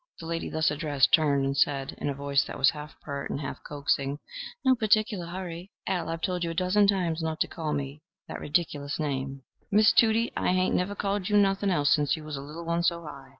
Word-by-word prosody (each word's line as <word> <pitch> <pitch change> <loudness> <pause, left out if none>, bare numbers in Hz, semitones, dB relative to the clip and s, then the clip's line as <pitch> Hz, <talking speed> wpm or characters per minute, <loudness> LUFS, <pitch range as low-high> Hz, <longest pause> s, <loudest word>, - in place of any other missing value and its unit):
The 165 - -8
lady 165 0 -3
thus 160 -1 +1
addressed 150 -2 +1
turned 145 -4 +4
and 135 0 -1
said, 140 -1 +1
in - - -2
a 140 - -2
voice 140 0 +1
that - - -7
was 135 - +5
half 150 -2 -10
pert 140 -1 -5
and - - -3
half 140 -2 -6
coaxing, 140 -1 -1 0.5
"No 260 - +6
particular 215 -5 +1
hurry. 175 0 -6 0.2
Al, 180 -3 -1
I've 165 0 -4
told 180 -1 -1
you 170 - -1
a 165 - -4
dozen 185 +3 +3
times 175 -5 +1
not 160 -1 -2
to - - +3
call 160 -3 -4
me 140 0 -4 0.3
that - - -6
redicklis 145 -2 -1
name." 135 -2 -3 0.3
"Why, 210 +2 +4
Tudie, 225 +1 +4
I - - +1
hain't 185 0 +2
never 190 +3 0
called 200 -1 -1
you 210 - +4
nothing 195 0 +3
else 145 -6 +3
sence 145 +1 +2
you 155 - -9
was 155 -1 -5
a 135 - -5
little 155 +4 -8
one 170 +1 0
so 170 -1 0
high. 140 -3 -10
160 Hz, 230 wpm, -27 LUFS, 145-185 Hz, 0.5 s, No